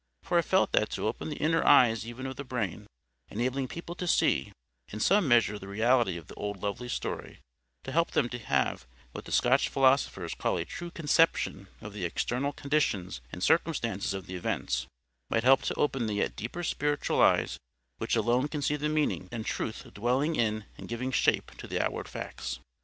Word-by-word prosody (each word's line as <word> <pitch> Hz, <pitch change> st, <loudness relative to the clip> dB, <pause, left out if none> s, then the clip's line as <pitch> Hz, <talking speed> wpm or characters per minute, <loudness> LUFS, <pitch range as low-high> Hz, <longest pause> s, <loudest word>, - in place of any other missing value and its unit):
For 175 Hz, -, +2 dB
I -, -, +4 dB
felt 190 Hz, +3 st, +2 dB
that 105 Hz, -, +2 dB
to -, -, -2 dB
open 110 Hz, -, -2 dB
the 150 Hz, -, -4 dB
inner 165 Hz, +3 st, +1 dB
eyes 115 Hz, -2 st, +5 dB
even 120 Hz, +3 st, -7 dB
of 130 Hz, 0 st, -4 dB
the 140 Hz, -, -6 dB
brain, 125 Hz, -8 st, -3 dB, 0.4 s
enabling 130 Hz, +4 st, -1 dB
people 170 Hz, +4 st, -7 dB
to 180 Hz, -, -3 dB
SEE -, -, +2 dB, 0.4 s
in 105 Hz, -, -7 dB
some 195 Hz, -, +4 dB
measure 115 Hz, -4 st, +4 dB
the 95 Hz, -, -9 dB
reality 110 Hz, -1 st, +2 dB
of 85 Hz, -, -10 dB
the -, -, -12 dB
old 100 Hz, -2 st, -5 dB
lovely 110 Hz, +4 st, -3 dB
story, -, -, -4 dB, 0.5 s
to 135 Hz, -, -6 dB
help 165 Hz, +4 st, +2 dB
them -, -, +1 dB
to 125 Hz, -, -5 dB
have 85 Hz, -, 0 dB, 0.2 s
what -, -, -8 dB
the -, -, -9 dB
Scotch 130 Hz, +3 st, +3 dB
philosophers 130 Hz, -10 st, +2 dB
call -, -, -1 dB
a -, -, -2 dB
true 175 Hz, -, -6 dB
CONCEPTION 160 Hz, -, +1 dB
of 105 Hz, -1 st, -8 dB
the 100 Hz, -3 st, -5 dB
external 125 Hz, +10 st, -1 dB
conditions 135 Hz, -, -1 dB
and 90 Hz, -, -6 dB
circumstances 115 Hz, -, +1 dB
of 95 Hz, -2 st, -6 dB
the 95 Hz, -, -8 dB
events, 65 Hz, -8 st, -2 dB, 0.4 s
might 115 Hz, -, +1 dB
help 130 Hz, +1 st, +6 dB
to -, -, -2 dB
open 135 Hz, -5 st, 0 dB
the 105 Hz, -, -1 dB
yet 100 Hz, -, -1 dB
deeper 145 Hz, +11 st, -5 dB
spiritual 145 Hz, -2 st, 0 dB
eyes -, -, +3 dB, 0.4 s
which -, -, 0 dB
alone 125 Hz, +4 st, +2 dB
can 150 Hz, -1 st, -4 dB
see 150 Hz, +1 st, +1 dB
the 150 Hz, +1 st, -1 dB
meaning 150 Hz, -11 st, 0 dB
and 115 Hz, -2 st, -4 dB
truth 110 Hz, -, -3 dB
dwelling 130 Hz, +9 st, +1 dB
in 110 Hz, -2 st, 0 dB
and -, -, -8 dB
giving 125 Hz, +3 st, -3 dB
shape -, -, +2 dB
to -, -, -7 dB
the -, -, -2 dB
outward -, -, -2 dB
facts. 65 Hz, -, -5 dB
125 Hz, 195 wpm, -29 LUFS, 105-145 Hz, 0.5 s, help